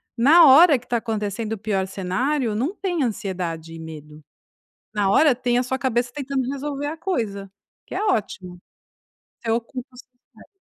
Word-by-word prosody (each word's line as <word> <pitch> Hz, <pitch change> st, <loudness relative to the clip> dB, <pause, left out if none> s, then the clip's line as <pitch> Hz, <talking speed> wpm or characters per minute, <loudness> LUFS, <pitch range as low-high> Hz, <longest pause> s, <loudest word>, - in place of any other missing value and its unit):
na 300 Hz, +8 st, +7 dB
hora 300 Hz, +2 st, +8 dB
que 245 Hz, -, -15 dB
tá 240 Hz, -, 0 dB
acontecendo 220 Hz, -1 st, -3 dB
o -, -, -4 dB
pior 195 Hz, -2 st, -1 dB
cenário, 215 Hz, +7 st, -1 dB
não 270 Hz, -, -2 dB
tem 360 Hz, -6 st, -2 dB
ansiedade 175 Hz, -7 st, -4 dB
e 165 Hz, -, -9 dB
medo. 155 Hz, -1 st, -10 dB, 0.7 s
Na 200 Hz, -2 st, +1 dB
hora 290 Hz, +4 st, +5 dB
tem 245 Hz, 0 st, 0 dB
a 250 Hz, -, +2 dB
sua 260 Hz, +1 st, -2 dB
cabeça 240 Hz, -1 st, -1 dB
tentando 270 Hz, -2 st, -3 dB
resolver 280 Hz, +1 st, -4 dB
a 310 Hz, -, -4 dB
coisa, 215 Hz, -, -3 dB, 0.4 s
que -, -, -9 dB
é -, -, -2 dB
ótimo, 190 Hz, -, -2 dB, 0.8 s
você 230 Hz, -, -2 dB
ocupa 240 Hz, +3 st, -3 dB
seu -, -, -14 dB, 0.3 s
cérebro. -, -, -17 dB
235 Hz, 170 wpm, -22 LUFS, 195-275 Hz, 0.8 s, hora